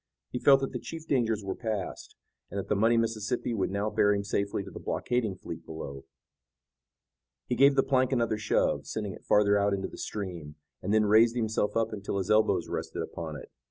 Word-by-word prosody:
He 125 - -3
felt 135 +1 +6
that 135 - -2
the - - -4
chief 160 -1 -8
dangers 115 -7 +1
were 95 -1 -2
passed, 110 -5 -5 0.3
and - - -6
that 100 - -4
the 105 - +2
muddy 115 +3 +3
Mississippi 115 +1 -1
would 100 -4 0
now 100 +2 -1
bear 105 0 +3
him 100 - -2
safely 100 0 -1
to 95 - -10
the - - -8
blockading 120 -6 -1
fleet - - -8
below. 70 -4 -8 1.4
He 125 - -1
gave 140 +2 +6
the 135 - +4
plank 130 -1 +2
another 115 -4 +1
shove, 110 - +1
sending 105 -3 -3
it - - -14
farther 105 0 +4
out 100 0 +2
into 95 -1 -3
the - - -11
stream, 85 -8 -5 0.3
and 95 - -2
then 110 0 +4
raised 115 +3 +5
himself 110 -2 0
up 115 -1 0
until 100 -1 -3
his 95 +2 -1
elbows 110 0 +3
rested - - -4
upon 80 -2 -6
it. 75 - -10
105 Hz, 205 wpm, -29 LUFS, 100-115 Hz, 1.4 s, felt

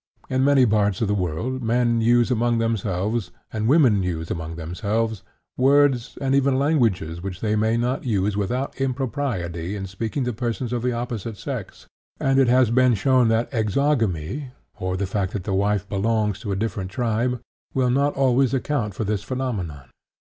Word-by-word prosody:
In 130 0 +2
many 140 -2 +5
parts 105 -3 +2
of 110 - +2
the 105 - +1
world, 100 +8 -2
men 120 0 +2
use 120 +2 +3
among 120 0 +2
themselves, 110 -2 -1 0.2
and 110 0 -1
women 130 -8 +5
use 85 -3 -3
among 80 -1 -4
themselves, 105 +6 -2 0.4
words 135 -2 +3
and 135 -1 0
even 135 -1 +3
languages 115 - +1
which 95 -1 -5
they 110 -1 0
may 110 +2 +2
not 125 +3 -1
use 105 -4 0
without 125 +7 -2
impropriety 120 - -2
in 100 -1 -4
speaking 110 +8 -3
to 125 -1 -2
persons 120 +1 -3
of 120 - -1
the 125 +1 0
opposite 115 -3 -4
sex, - - -6 0.3
and 135 0 +2
it 135 - +4
has 125 -1 +4
been 125 0 +4
shown 130 +3 +3
that 115 +1 +1
exogamy, 115 - 0 0.3
or 95 0 -2
the 100 - -1
fact 95 -1 -2
that 100 - -3
the 95 - -2
wife 100 0 +1
belongs 105 0 0
to 105 -1 -4
a - - 0
different 95 -2 -3
tribe, 120 +3 -1 0.4
will 130 -2 +2
not 140 +3 +1
always 130 -1 +3
account 125 -7 -1
for 110 - -2
this 105 -1 -1
phenomenon. 100 - -4
115 Hz, 175 wpm, -23 LUFS, 100-130 Hz, 0.4 s, many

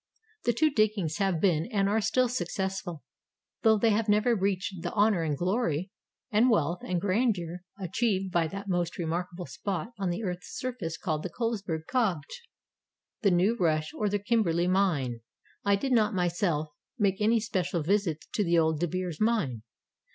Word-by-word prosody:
The 240 - +3
two 310 +6 +3
diggings 210 - +1
have 195 -5 +1
been 165 -2 +2
and 200 -3 +2
are 215 +2 +2
still 245 +4 +2
successful, 190 - -3 0.6
though 220 -2 +5
they 225 +2 +3
have 215 +1 +1
never 215 +3 +4
reached 195 -2 -1
the - - -3
honor 205 -3 +3
and 150 -3 -1
glory 185 - 0 0.4
and 220 +4 +4
wealth 175 -5 +2
and 180 -1 -1
grandeur 185 -3 0 0.2
achieved 190 0 0
by 170 -2 +2
that 195 +5 -7
most 175 -2 -1
remarkable 175 +1 -3
spot 200 +4 -4
on 195 -2 0
the 175 +6 -2
earth's 180 -2 -5
surface 235 -11 -4
called 155 -5 -2
the - - -4
Colesberg 205 -9 -2
Kopje, 220 - -1 0.8
the 205 - +4
New 185 +5 +3
Rush, 155 -6 0
or 210 - 0
the 205 - +1
Kimberley 200 -6 +1
mine. 165 -11 +1 0.4
I 200 0 +4
did 265 +7 -2
not 215 -4 +3
myself 175 -3 0 0.3
make 200 -3 +1
any 225 +2 +4
special 180 -6 -1
visit 180 -3 0
to 210 - +1
the 170 -2 +2
Old 160 -2 +2
De 175 - +1
Beers 180 -1 -4
mine. 215 - +1
190 Hz, 170 wpm, -28 LUFS, 170-215 Hz, 0.8 s, though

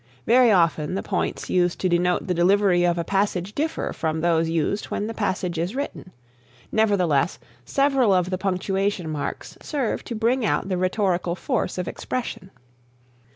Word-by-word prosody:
Very 245 0 +5
often 170 -3 +2
the 195 - -2
points 190 - -2
used 180 -1 +1
to 185 - +2
denote 180 0 +1
the 185 - 0
delivery 180 +1 +3
of 175 0 +1
a 170 - 0
passage 195 +1 -1
differ 315 +5 -2
from 160 -1 -2
those 165 -1 +2
used 165 +5 0
when 205 - -3
the 225 - -4
passage 190 -5 -2
is 175 +8 -2
written. 275 -9 -5 0.6
Nevertheless, 180 -9 +2 0.3
several 275 -5 +2
of 185 -1 +2
the 185 - 0
punctuation 195 -1 -1
marks 150 -2 -5
serve 275 -7 -2
to 235 - -5
bring 235 +3 +1
out 200 -2 0
the 185 - 0
rhetorical 185 -2 0
force - - -2
of 180 - -3
expression. 235 -6 -4
185 Hz, 160 wpm, -24 LUFS, 175-210 Hz, 0.6 s, Very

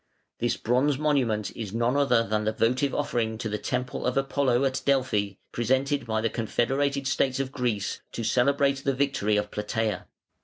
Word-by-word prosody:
This 120 0 0
bronze 130 +4 +1
monument 130 -9 0
is 110 -2 -5
none 120 +3 +1
other 135 -5 +3
than 110 0 -1
the 110 - +1
votive 125 +5 +1
offering 115 -6 -1
to 110 - -4
the 105 0 -3
temple 125 +4 -2
of 125 - 0
Apollo 135 -2 +1
at 130 -1 -1
Delphi, 125 -8 +1 0.2
presented 130 +2 0
by 110 -1 0
the 115 - +2
confederated 135 +4 0
states 135 -1 +1
of 135 -1 -2
Greece, 120 -8 -2
to 115 - -4
celebrate 140 +4 +2
the 135 -1 +1
victory 130 -7 +1
of 105 0 -2
Platæa. 105 +1 -2
125 Hz, 170 wpm, -27 LUFS, 110-135 Hz, 0.2 s, other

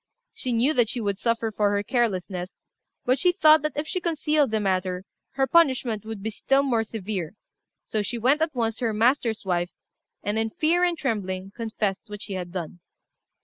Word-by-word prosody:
She 255 - -4
knew 245 +6 +3
that 240 -6 +3
she 245 - -3
would 200 -3 -2
suffer 230 -1 0
for 210 -1 +2
her 200 - 0
carelessness; 190 -7 -1 0.5
but 255 +1 +2
she 360 - +4
thought 310 -2 +6
that 305 +1 -2
if 300 +1 -2
she 365 - -2
concealed 305 -4 +1
the 220 0 0
matter 185 -2 -1 0.3
her 270 0 +2
punishment 260 -9 +2
would 220 -3 -6
be 220 - -2
still 270 +6 +2
more 235 -5 +1
severe; 200 -5 -4 0.5
so 215 - -1
she 220 +4 -3
went 265 +7 +3
at 320 -3 0
once 225 -2 0
to 245 - -2
her 225 - +1
master's 230 -1 +2
wife, 175 -1 0 0.5
and, 205 +2 0
in 225 0 0
fear 330 +9 +2
and 350 -1 +2
trembling, 195 -8 -2
confessed 215 -4 -2
what 210 -1 -7
she 200 - -5
had 180 -2 -4
done. 175 -1 -5
225 Hz, 195 wpm, -25 LUFS, 200-270 Hz, 0.5 s, thought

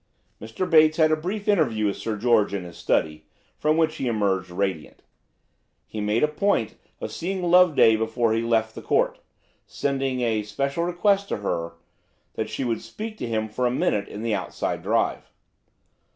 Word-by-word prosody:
Mr. 115 - -4
Bates 155 -2 +5
had 155 -1 +4
a - - +4
brief 190 +7 -5
interview 135 - +2
with 100 - 0
Sir 110 -2 -4
George 110 -2 +2
in 95 - -3
his 85 -1 -10
study, 75 -1 -1 0.3
from 155 +1 +2
which 160 -1 +1
he 130 - -2
emerged 100 -5 0
radiant. 90 -3 -3 0.8
He 110 - -6
made 105 +4 +1
a - - +5
point 150 - 0 0.3
of - - -5
seeing 185 +2 -3
Loveday 175 -10 +5
before 110 +1 0
he 115 - +1
left 110 -1 +1
the - - -8
Court, - - +1 0.5
sending 135 -2 -2
a 115 -3 +1
special 140 +10 -2
request 195 +3 +1
to - - -1
her 85 -5 -3 0.6
that - - -3
she - - -3
would 115 -3 -1
speak 215 - -7
to - - -3
him 110 -1 -1
for 125 +3 -1
a - - +2
minute 105 -4 0
in 105 - -7
the 115 -2 0
outside - - -3
drive. - - -1
115 Hz, 180 wpm, -24 LUFS, 105-155 Hz, 0.8 s, Bates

